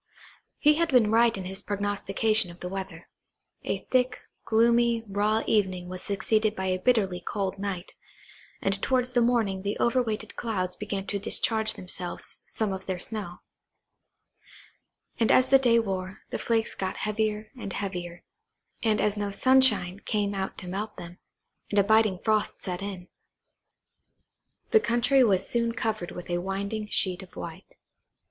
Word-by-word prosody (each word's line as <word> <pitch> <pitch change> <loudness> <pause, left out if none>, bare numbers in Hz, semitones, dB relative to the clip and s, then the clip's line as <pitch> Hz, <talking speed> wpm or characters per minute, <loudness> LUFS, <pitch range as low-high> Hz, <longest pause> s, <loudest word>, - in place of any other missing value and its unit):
He 300 0 +5
had 335 0 +1
been 235 -5 +4
right 230 -1 +4
in 190 - -5
his 190 +1 -3
prognostication 205 0 +1
of 175 +1 -12
the 180 - -5
weather. 190 -3 -6 0.6
A - - -3
thick, 255 0 +2 0.3
gloomy, 235 +1 +3
raw 210 +2 +1
evening 185 -4 0
was 185 0 -6
succeeded 215 +2 +1
by 190 - -3
a 185 0 0
bitterly 195 -5 +2
cold 195 0 -3
night, 195 -3 -4 0.7
and 195 0 +2
towards 255 -2 +1
the 245 - +3
morning 225 -5 +1
the 200 +2 -2
over 250 +2 +2
weighted 220 -2 -4
clouds 185 -6 -2
began 200 -1 -4
to 200 0 -2
discharge 220 +2 +1
themselves 180 -1 -4
of - - -9
some 215 -3 0
of 190 0 -7
their 185 -1 -2
snow; 195 -2 -5 1.8
and 225 - +3
as 255 0 +5
the 270 - +7
day 240 -3 +4
wore, 190 -4 -3
the - - -3
flakes 225 -1 0
got 190 -1 -4
heavier 215 0 -2
and 200 -6 -6
heavier; 180 -3 -5 0.6
and 220 -2 +2
as 210 -1 +1
no 205 -1 -2
sunshine 255 -5 +4
came 205 -1 -1
out 195 -1 -4
to 180 - -6
melt 205 +4 -4
them, 175 +1 -10 0.5
and 205 - -2
a 200 - +6
biting 215 -2 +3
frost 215 -1 +1
set 180 -1 -4
in, 190 -3 -6 1.6
the 445 - +7
country 255 - +3
was 195 -6 +2
soon 235 -1 0
covered 215 -6 -2
with 180 - -8
a 175 0 -1
winding 200 +3 -3
sheet 185 -3 0
of 190 - -14
white. - - -9
205 Hz, 160 wpm, -27 LUFS, 190-225 Hz, 1.8 s, the